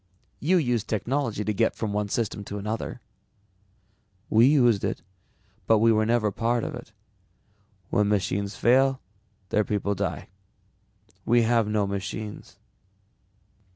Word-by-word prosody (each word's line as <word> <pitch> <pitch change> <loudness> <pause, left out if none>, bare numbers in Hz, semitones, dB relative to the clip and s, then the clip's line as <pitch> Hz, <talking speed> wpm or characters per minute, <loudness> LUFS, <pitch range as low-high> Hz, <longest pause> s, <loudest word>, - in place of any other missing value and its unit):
"You 180 +6 +2
used 120 - 0
technology 115 0 -1
to 105 - -1
get 115 +3 +1
from 105 -3 -3
one 105 0 -1
system 105 -2 -2
to 100 - -6
another." 110 +4 -4 1.3
"We 115 +3 +6
used 120 -8 +4
it, - - -3 0.6
but 110 - +5
we 115 +2 +4
were 110 0 +2
never 115 -3 +2
part 115 +3 0
of - - -4
it. - - -9 1.0
When 105 -1 +2
machines 100 0 -1
fail, 135 +2 +3 0.5
their 105 - +2
people 100 -1 -1
die. 95 - -4 0.9
We 120 0 +3
have 115 -1 +2
no 105 -1 +1
machines." 100 +2 -6
110 Hz, 130 wpm, -26 LUFS, 105-120 Hz, 1.3 s, We